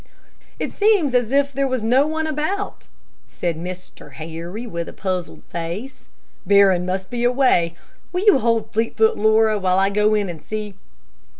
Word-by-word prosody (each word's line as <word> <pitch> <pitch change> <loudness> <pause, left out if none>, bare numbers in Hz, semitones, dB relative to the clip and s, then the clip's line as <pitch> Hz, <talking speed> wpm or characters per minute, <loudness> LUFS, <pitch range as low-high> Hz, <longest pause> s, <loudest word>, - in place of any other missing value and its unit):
"It - - -4
seems 405 - +3
as 245 -2 +1
if 280 0 +2
there 275 +1 0
was 255 -4 -2
no 255 +6 +3
one 315 0 -2
about," 315 +7 -3 0.4
said 170 -2 -3
Mr. 180 -4 -9
Harry, 165 - -7
with 170 -7 -5
a - - -11
puzzled 185 -3 -4
face. 175 +11 -6 0.4
"Barron 195 -3 +4
must 190 +2 -3
be 240 -1 -2
away. 245 -10 +2 0.4
Will 360 +3 -2
you 410 -10 +6
hold 230 -2 0
Fleetfoot, 225 0 +2
Laura, 220 0 +3
while 185 -1 +1
I 195 +1 +3
go 210 +1 +2
and 180 -7 -3
see?" 215 -1 -5
215 Hz, 160 wpm, -21 LUFS, 185-260 Hz, 0.4 s, you